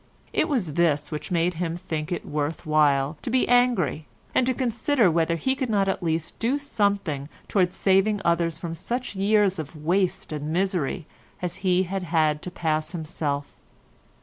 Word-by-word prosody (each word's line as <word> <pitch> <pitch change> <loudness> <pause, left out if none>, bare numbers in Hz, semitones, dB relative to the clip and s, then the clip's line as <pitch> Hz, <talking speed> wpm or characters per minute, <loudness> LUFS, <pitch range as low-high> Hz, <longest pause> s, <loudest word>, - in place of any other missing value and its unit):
It 315 - +2
was 215 - 0
this 150 -3 +1
which 150 - -5
made 175 0 +1
him 170 -1 -1
think 160 -3 -4
it 175 - -3
worth 150 +1 -3
while 150 -1 +2
to - - -3
be 255 +1 +2
angry, 240 - +2 0.3
and 255 - +3
to 260 - +2
consider 235 - +2
whether 165 0 +2
he 265 +11 0
could 265 -2 -3
not 200 -3 +2
at 195 - -1
least 165 -2 -2
do 245 +5 +1
something 200 - -1 0.2
towards 185 -3 +1
saving 195 +2 +3
others 170 -1 +2
from 165 -1 -5
such 240 +7 -4
years 200 -1 +3
of 155 +1 -6
waste 175 +5 0
and 150 0 -3
misery 175 -3 0 0.3
as 180 -2 -3
he 185 -1 +2
had 190 +1 -3
had 160 -3 +1
to - - -5
pass 155 -2 -1
himself. 150 -3 -3
175 Hz, 175 wpm, -25 LUFS, 155-200 Hz, 0.3 s, and